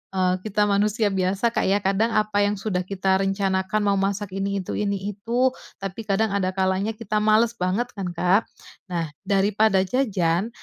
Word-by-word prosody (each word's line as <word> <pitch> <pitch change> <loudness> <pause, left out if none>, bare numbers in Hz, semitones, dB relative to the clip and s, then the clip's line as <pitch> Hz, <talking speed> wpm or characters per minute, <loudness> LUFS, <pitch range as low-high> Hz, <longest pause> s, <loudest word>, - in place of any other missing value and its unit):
eee, 185 -1 +2
kita 210 0 +1
manusia 210 +2 +2
biasa 190 +5 +1
Kak, - - 0
ya 200 +1 +3
kadang 195 +4 +1
apa 210 -1 +2
yang 205 - +1
sudah 190 -3 -1
kita 190 0 +1
rencanakan 195 +1 0
mau 200 -1 +2
masak 195 0 -2
ini 195 0 -1
itu - - -5
ini 200 -1 -2
itu, 235 +6 +1 0.3
tapi 195 +3 -5
kadang 215 +2 +1
ada 190 -2 0
kalanya 190 +3 0
kita 215 -1 -3
males 220 +2 +4
banget 200 +6 -1
kan, 190 -2 -3
Kak. 180 +5 +2 0.4
Nah, 170 -3 -2 0.2
daripada 200 0 +3
jajan 195 -5 0
200 Hz, 170 wpm, -24 LUFS, 190-215 Hz, 0.4 s, males